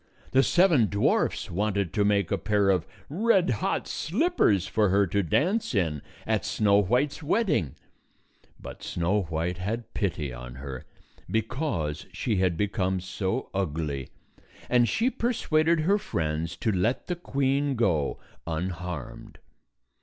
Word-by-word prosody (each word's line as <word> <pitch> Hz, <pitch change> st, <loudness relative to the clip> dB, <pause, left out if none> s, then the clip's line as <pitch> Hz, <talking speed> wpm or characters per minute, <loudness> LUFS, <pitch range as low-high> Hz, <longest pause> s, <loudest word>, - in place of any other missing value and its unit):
The 135 Hz, -, +5 dB
seven 170 Hz, -, +4 dB
dwarfs 100 Hz, -2 st, +1 dB
wanted 100 Hz, -1 st, -1 dB
to 105 Hz, -, +2 dB
make 100 Hz, -3 st, +2 dB
a 100 Hz, -, +2 dB
pair 100 Hz, +1 st, +2 dB
of 90 Hz, -1 st, 0 dB, 0.2 s
red 190 Hz, -, +2 dB
hot -, -, -1 dB
slippers 180 Hz, -, +1 dB
for 105 Hz, +1 st, +2 dB
her 100 Hz, +2 st, +4 dB
to 100 Hz, +3 st, 0 dB
dance 180 Hz, -, +1 dB
in 80 Hz, -7 st, 0 dB, 0.2 s
at 110 Hz, -2 st, 0 dB
Snow 105 Hz, -2 st, +3 dB
White's 125 Hz, -, 0 dB
wedding. 150 Hz, -, +1 dB, 0.8 s
But -, -, -9 dB
Snow 90 Hz, +5 st, 0 dB
White 85 Hz, +2 st, -2 dB
had 110 Hz, +5 st, -4 dB
pity 80 Hz, -, -2 dB
on 60 Hz, +1 st, -8 dB
her, 65 Hz, -1 st, -7 dB, 0.4 s
because 110 Hz, -, -2 dB
she 110 Hz, -5 st, -1 dB
had 90 Hz, -3 st, +1 dB
become 95 Hz, -2 st, 0 dB
so 95 Hz, +5 st, -3 dB
ugly, 75 Hz, -7 st, -2 dB, 0.6 s
and 120 Hz, -2 st, +4 dB
she 235 Hz, -, +1 dB
persuaded 170 Hz, -10 st, +1 dB
her 195 Hz, +6 st, +3 dB
friends 80 Hz, -, -2 dB
to 110 Hz, -, 0 dB
let 100 Hz, +6 st, 0 dB
the 180 Hz, -, -2 dB
queen 140 Hz, -3 st, 0 dB
go 90 Hz, -, +1 dB, 0.3 s
unharmed. 85 Hz, -2 st, -5 dB
100 Hz, 135 wpm, -27 LUFS, 85-140 Hz, 0.8 s, The